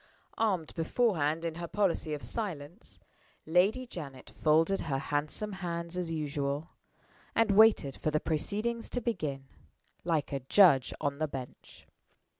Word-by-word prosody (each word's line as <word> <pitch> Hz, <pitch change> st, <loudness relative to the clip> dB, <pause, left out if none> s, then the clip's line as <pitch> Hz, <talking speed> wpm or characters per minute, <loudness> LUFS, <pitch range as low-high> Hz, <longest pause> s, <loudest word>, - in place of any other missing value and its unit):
Armed 190 Hz, -8 st, 0 dB
beforehand 165 Hz, -4 st, +1 dB
in 165 Hz, -, -2 dB
her 170 Hz, -, -4 dB
policy 185 Hz, -5 st, 0 dB
of 145 Hz, -, -9 dB
silence, 180 Hz, -3 st, -5 dB, 0.5 s
Lady 190 Hz, +10 st, +3 dB
Janet 140 Hz, -, -9 dB
folded 160 Hz, +5 st, +2 dB
her 140 Hz, -4 st, -1 dB
handsome 150 Hz, +10 st, -2 dB
hands 170 Hz, -1 st, -3 dB
as 180 Hz, -2 st, -2 dB
usual, 145 Hz, 0 st, -2 dB, 0.6 s
and 225 Hz, -2 st, +3 dB
waited 205 Hz, -10 st, +5 dB
for -, -, -1 dB
the 155 Hz, 0 st, +1 dB
proceedings 215 Hz, +10 st, -2 dB
to 245 Hz, -, -2 dB
begin, 155 Hz, -, -3 dB, 0.6 s
like 160 Hz, -4 st, 0 dB
a 140 Hz, -, -1 dB
judge 135 Hz, 0 st, +5 dB
on 140 Hz, 0 st, -2 dB
the 155 Hz, -, +1 dB
bench. 135 Hz, -3 st, -9 dB
165 Hz, 135 wpm, -31 LUFS, 145-200 Hz, 0.6 s, waited